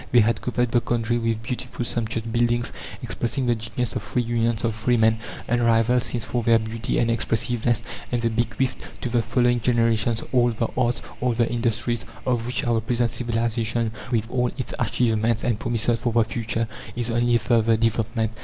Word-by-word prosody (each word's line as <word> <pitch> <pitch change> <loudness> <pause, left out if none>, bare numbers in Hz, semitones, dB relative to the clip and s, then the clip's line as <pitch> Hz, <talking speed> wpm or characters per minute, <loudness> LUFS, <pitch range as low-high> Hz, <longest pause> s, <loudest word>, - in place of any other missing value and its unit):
They 120 - +7
had 115 +2 +1
covered 125 -1 0
the 120 - +3
country 120 0 0
with 115 -1 -1
beautiful 125 0 -4
sumptuous 115 -1 -1
buildings, 120 +1 +1 0.3
expressing 125 +2 -2
the 120 - +3
genius 115 +1 -3
of - - -1
free 125 - -1
unions 115 -1 0
of 115 -1 +1
free 120 +3 +1
men, 110 0 +3 0.3
unrivalled 120 0 +3
since 120 -2 0
for 120 +3 -1
their 115 0 +5
beauty 115 +1 -2
and 115 -1 +2
expressiveness; 115 0 0 0.3
and 120 - +1
they 115 0 +1
bequeathed 120 +3 -1 0.2
to 125 - -2
the 120 0 +2
following 120 +1 +2
generations 115 -1 +2
all 120 -2 +4
the 115 0 -1
arts, 120 -2 +1 0.2
all 125 -1 +2
the 115 0 +2
industries, 120 -1 0 0.2
of 120 -2 0
which 125 - 0
our 115 -2 +2
present 120 0 0
civilization, 115 -1 -1 0.2
with 110 -2 +1
all 125 -1 +1
its 130 - -4
achievements 115 0 +1
and 115 -3 0
promises 115 0 0
for 120 - -1
the 115 0 +4
future, 115 0 -2 0.3
is 120 -1 -1
only 120 +1 +2
a - - +7
further 115 -1 +2
development. 115 0 0
115 Hz, 185 wpm, -24 LUFS, 115-120 Hz, 0.3 s, They